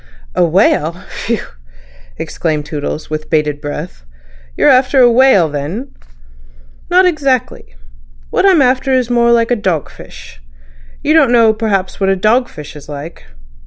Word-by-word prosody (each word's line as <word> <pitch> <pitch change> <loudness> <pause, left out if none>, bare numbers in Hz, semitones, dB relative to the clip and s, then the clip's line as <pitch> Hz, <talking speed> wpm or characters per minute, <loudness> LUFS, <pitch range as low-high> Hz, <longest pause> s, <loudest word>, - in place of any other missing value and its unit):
"A - - +2
whale. 170 -2 +2 0.2
Phew!" 230 -1 -3 0.7
exclaimed 155 -3 -3
Toodles, 150 0 -5
with 155 0 -5
bated 150 -2 -1
breath. 150 - -7 0.5
"You're - - +3
after 260 +1 +4
a 245 -2 +6
whale, 235 -8 +4
then?" 155 - -5 1.0
"Not 365 +1 +4
exactly. 270 - -1 0.6
What - - +1
I 395 - +5
am 340 -7 +4
after 260 +1 +1
is 255 -2 +1
more 235 0 +3
like 230 0 +2
a - - +3
dog 185 - -2
fish. - - -14 0.6
You 305 - +2
don't 300 -6 +4
know 230 -2 +4
perhaps 210 -4 -2
what 195 -1 +1
a 195 - +2
dog 225 +6 +1
fish 150 -1 -11
is 145 0 -12
like." 145 +3 -9
210 Hz, 155 wpm, -14 LUFS, 155-255 Hz, 1.0 s, a